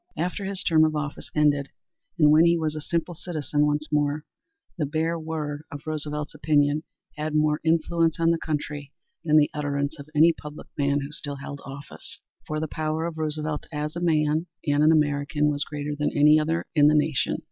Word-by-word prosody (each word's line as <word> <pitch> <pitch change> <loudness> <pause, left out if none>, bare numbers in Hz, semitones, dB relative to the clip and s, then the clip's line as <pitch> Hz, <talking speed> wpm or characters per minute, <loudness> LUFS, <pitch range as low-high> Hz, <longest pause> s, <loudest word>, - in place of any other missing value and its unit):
After 180 +4 -2
his 195 -1 -2
term 160 -1 +4
of 155 -1 +2
office 150 -1 -4
ended 145 -2 +2 0.5
and 150 -3 +6
when 155 +2 +7
he 170 0 +4
was 155 -2 -1
a 155 - -5
simple 170 +2 -2
citizen 155 -3 -1
once 150 +1 -1
more, 150 0 0 0.5
the 150 -5 -1
bare 160 +3 -1
word 155 -2 -4
of 145 - -7
Roosevelt's 150 -1 -3
opinion 150 0 +2 0.4
had 155 0 -3
more 150 0 +2
influence 165 0 +1
on 165 0 +4
the 165 - 0
country 145 -2 -4 0.3
than 155 -1 +4
the 150 -1 +4
utterance 145 0 -2
of 140 +1 -10
any 165 +3 +6
public 150 -1 -10
man 140 0 +1
who 140 +1 -6
still 145 -1 -4
held 140 +1 -8
office. 140 +1 -10 0.3
For 155 0 -2
the 160 - -2
power 155 +2 -2
of 165 -2 -5
Roosevelt 155 -1 -2
as 150 0 -3
a - - -2
man 155 0 +1 0.2
and 145 -1 +2
an 155 - +6
American 150 -1 +2
was 145 -1 -1
greater 150 0 -4
than 150 0 0
any 150 +1 +6
other 160 +2 -1
in 150 -3 +6
the 150 - +5
nation. 150 -1 +1
150 Hz, 195 wpm, -25 LUFS, 145-160 Hz, 0.5 s, when